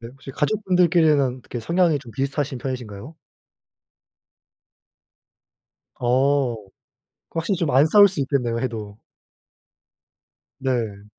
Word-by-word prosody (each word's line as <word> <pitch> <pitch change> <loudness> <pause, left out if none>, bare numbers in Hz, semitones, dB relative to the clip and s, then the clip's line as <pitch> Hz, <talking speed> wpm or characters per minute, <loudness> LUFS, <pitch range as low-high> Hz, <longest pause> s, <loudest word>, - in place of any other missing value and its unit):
네 115 - -9
혹시 135 +2 -12
가족분들끼리는 160 - +2
어떻게 120 -1 -7
성향이 170 +1 +1
좀 120 -5 -13
비슷하신 140 +2 -2
편이신가요? 125 +1 -7 2.9
어 130 0 +1 0.8
확실히 170 +4 -2
좀 165 -3 -1
안 135 +4 +5
싸울 205 +4 +7
수 185 -6 -5
있겠네요, 130 -4 -1
해도. 110 -4 -5 1.6
네. 115 -6 -2
135 Hz, 225 characters per minute, -22 LUFS, 120-160 Hz, 2.9 s, 싸울